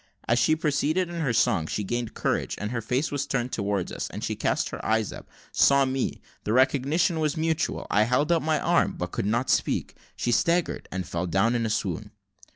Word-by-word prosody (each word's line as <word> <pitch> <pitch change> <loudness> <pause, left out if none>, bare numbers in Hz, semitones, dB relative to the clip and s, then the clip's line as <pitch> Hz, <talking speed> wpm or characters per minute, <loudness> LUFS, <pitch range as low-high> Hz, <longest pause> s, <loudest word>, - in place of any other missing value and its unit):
As 120 +2 +3
she 155 +6 +4
proceeded 160 +3 0
in 170 -1 -4
her 140 -5 +1
song, 85 -8 +2
she 105 - -2
gained 120 +2 -3
courage, - - -1
and 105 +1 -4
her 120 -2 -2
face 125 +7 -1
was 145 -1 -2
turned 125 -1 -1
towards 100 -3 -1
us, - - -4
and - - -7
she - - -1
cast - - 0
her - - -7
eyes 110 -1 0
up - - -11 0.2
saw 140 0 +5
me 130 0 -2 0.2
the 105 - -1
recognition 140 +6 +2
was 155 0 0
mutual 160 0 -1
I 105 +1 +4
held 130 +7 +1
out 170 - +3
my 155 -1 +1
arm, 175 0 +2
but 90 0 -4
could - - -2
not 120 +4 +1
speak - - 0 0.2
she 120 - -1
staggered, 170 +8 +1
and 95 -1 -3
fell 85 +2 -2
down 95 +7 +2
in 115 -2 0
a - - -3
swoon. 110 - -2
125 Hz, 215 wpm, -26 LUFS, 110-155 Hz, 0.2 s, saw